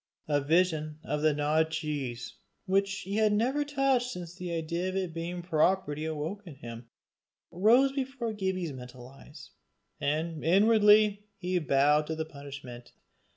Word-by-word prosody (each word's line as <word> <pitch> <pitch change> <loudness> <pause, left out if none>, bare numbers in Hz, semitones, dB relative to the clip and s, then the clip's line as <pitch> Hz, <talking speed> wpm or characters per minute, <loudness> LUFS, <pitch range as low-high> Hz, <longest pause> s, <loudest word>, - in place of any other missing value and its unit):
A 145 -1 +1
vision 155 0 +1
of 150 0 -2
the 155 0 +4
gnawed 150 +2 +1
cheese, 140 -7 -4 0.3
which 195 +1 +1
he 200 +2 -4
had 215 -1 +3
never 250 +8 +1
touched 275 -4 +1
since 175 -6 -7
the 180 -1 -6
idea 170 +2 -2
of 185 - -5
its 185 -3 -2
being 170 +1 -5
property 160 -2 +1
awoke 160 +6 -4
in 155 - -9
him, 115 -1 -9 0.6
rose 230 +10 +4
before 265 -4 -3
Gibbie's 190 -6 -2
mental 125 -1 -10
eyes, 135 +2 -14 0.5
and 155 +2 -2
inwardly 210 +3 +5
he 180 -1 -1
bowed 150 0 +3
to 160 - -2
the 160 0 -3
punishment. 140 -5 -10
170 Hz, 150 wpm, -29 LUFS, 150-200 Hz, 0.6 s, inwardly